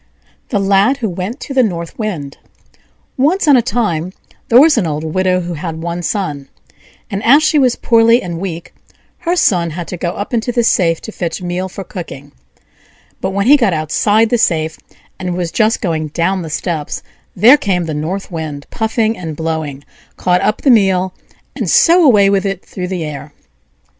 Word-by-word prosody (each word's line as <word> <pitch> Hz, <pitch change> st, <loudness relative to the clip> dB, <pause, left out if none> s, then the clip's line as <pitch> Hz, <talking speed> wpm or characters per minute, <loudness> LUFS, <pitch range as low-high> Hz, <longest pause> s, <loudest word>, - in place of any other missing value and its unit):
THE 220 Hz, -, 0 dB
LAD 200 Hz, +6 st, +3 dB
WHO 230 Hz, -6 st, -2 dB
WENT 190 Hz, -, -5 dB
TO 275 Hz, -, -7 dB
THE 265 Hz, -, +4 dB
NORTH 170 Hz, -6 st, -3 dB
WIND 165 Hz, -11 st, -4 dB, 0.8 s
Once 315 Hz, +7 st, +2 dB
on 290 Hz, -, +7 dB
a 250 Hz, -, +5 dB
time 205 Hz, -8 st, -2 dB, 0.4 s
there 235 Hz, -, +7 dB
was 305 Hz, +2 st, +6 dB
an 210 Hz, -8 st, +1 dB
old 150 Hz, 0 st, -3 dB
widow 185 Hz, +3 st, 0 dB
who 175 Hz, 0 st, -5 dB
had 160 Hz, 0 st, -5 dB
one 170 Hz, +1 st, -3 dB
son; 150 Hz, -8 st, -3 dB, 0.6 s
and 200 Hz, +1 st, -3 dB
as 285 Hz, +6 st, +5 dB
she 310 Hz, -1 st, +3 dB
was 255 Hz, -3 st, +3 dB
poorly 230 Hz, 0 st, +4 dB
and 170 Hz, -5 st, -5 dB
weak, 170 Hz, -3 st, -6 dB, 0.5 s
her 350 Hz, 0 st, -1 dB
son 175 Hz, -, +2 dB
had 170 Hz, +2 st, -6 dB
to 180 Hz, -, -5 dB
go 170 Hz, 0 st, -2 dB
up 205 Hz, +4 st, -6 dB
into 235 Hz, +1 st, 0 dB
the 240 Hz, -1 st, +1 dB
safe 165 Hz, -7 st, +2 dB
to 220 Hz, -, -8 dB
fetch 175 Hz, -2 st, -4 dB
meal 180 Hz, +1 st, -3 dB
for 195 Hz, -, -7 dB
cooking; 145 Hz, -7 st, -9 dB, 0.9 s
but 190 Hz, -, -2 dB
when 200 Hz, +1 st, -1 dB
he 280 Hz, +5 st, +7 dB
got 230 Hz, -10 st, +2 dB
outside 205 Hz, +8 st, +1 dB
the 240 Hz, -, +2 dB
safe, 160 Hz, -5 st, 0 dB, 0.4 s
and 180 Hz, -2 st, -3 dB
was 175 Hz, -2 st, -2 dB
just 220 Hz, 0 st, +1 dB
going 160 Hz, -5 st, -1 dB
down 175 Hz, +5 st, -1 dB
the 165 Hz, -, -6 dB
steps, 155 Hz, -1 st, -3 dB, 0.3 s
there 225 Hz, +9 st, +7 dB
came 185 Hz, -, -1 dB
the 160 Hz, -, -4 dB
North 175 Hz, +7 st, -4 dB
Wind 155 Hz, -4 st, -5 dB
puffing 220 Hz, 0 st, 0 dB
and 165 Hz, -5 st, -6 dB
blowing, 160 Hz, -3 st, -4 dB, 0.3 s
caught 180 Hz, 0 st, +1 dB
up 215 Hz, -, -1 dB
the 275 Hz, -, +5 dB
meal, 190 Hz, -4 st, +3 dB, 0.4 s
and -, -, -3 dB
so 345 Hz, +1 st, +5 dB
away 210 Hz, -9 st, +5 dB
with 195 Hz, -1 st, +2 dB
it 195 Hz, -2 st, -4 dB
through 180 Hz, -1 st, -6 dB
the 180 Hz, -2 st, -3 dB
air. 145 Hz, -1 st, -8 dB
185 Hz, 190 wpm, -15 LUFS, 165-225 Hz, 0.9 s, on